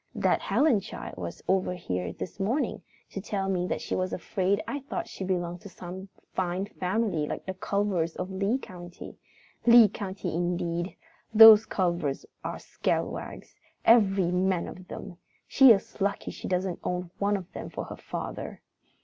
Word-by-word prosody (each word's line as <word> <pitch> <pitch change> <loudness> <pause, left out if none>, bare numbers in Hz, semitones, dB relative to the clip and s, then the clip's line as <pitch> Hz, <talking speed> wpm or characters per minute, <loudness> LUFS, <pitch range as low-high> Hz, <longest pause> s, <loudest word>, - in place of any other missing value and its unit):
That - - +2
Helen 280 -8 +3
child 195 - -8
was 85 -1 -6
over 185 -1 +1
here 90 - -3
this 185 - -7
morning, 230 +10 -1 0.3
to 195 - -5
tell 195 -1 -2
me 180 -2 0
that - - -2
she - - -4
was 185 0 -1
afraid 190 +2 0
I 285 - -3
thought 285 +5 -5
she - - -7
belonged 175 -2 -2
to 200 - -10
some 185 +2 -9 0.2
fine 185 +1 -1
family 185 -5 -1
like - - -5
the 190 - -3
Culvers 190 -4 -1
of 185 - -4
Lee 195 +6 0
County. 175 -7 -10 0.5
Lee 235 -2 +9
County 190 -3 -5
indeed! 175 +1 -2 0.4
Those 220 0 +10
Culvers 170 -8 -1 0.2
are - - -4
scalawags, - - -3 0.3
every 195 -6 +5
man 180 -1 +1
of 185 0 -10
them! 175 - -8 0.3
She 270 -1 +7
is 200 -1 +1
lucky 200 +1 -1
she - - -7
doesn't 185 -1 -1
own 180 -1 -3
one 205 0 +2
of 185 -2 -10
them - - -6
for - - -5
a - - -5
father. - - -6
185 Hz, 165 wpm, -28 LUFS, 175-200 Hz, 0.5 s, Those